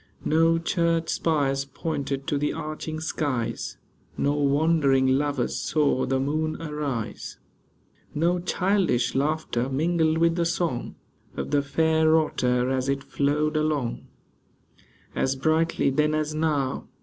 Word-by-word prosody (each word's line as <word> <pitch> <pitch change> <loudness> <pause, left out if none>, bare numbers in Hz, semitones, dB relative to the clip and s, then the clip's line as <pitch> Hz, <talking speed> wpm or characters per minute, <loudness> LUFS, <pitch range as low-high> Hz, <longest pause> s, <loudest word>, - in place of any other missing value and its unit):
No 165 +1 +3
church 165 -1 0
spires 140 -4 +1
pointed 140 -1 -4
to 150 -4 -1
the 150 - 0
arching 155 +1 -5
skies; 145 -6 -3 0.4
No 145 - +1
wandering 145 -1 +2
lovers 135 0 0
saw 145 -5 +1
the 130 0 +1
moon 155 +3 -1
arise; 150 -7 -4 0.8
No 170 +4 +2
childish 180 - +1
laughter 140 -3 -1
mingled 160 +3 +1
with 165 +1 +2
the 170 - +2
song 170 -7 -2 0.4
Of - - -4
the 145 -1 +3
fair 160 +2 +3
Otter, 125 -5 +1
as 130 0 -1
it 135 0 -1
flowed 150 +2 0
along 150 -5 -1 1.1
As 135 0 0
brightly 155 +1 +1
then 150 +2 +1
as 155 0 -1
now. 150 -4 -1
150 Hz, 125 wpm, -25 LUFS, 135-160 Hz, 1.1 s, No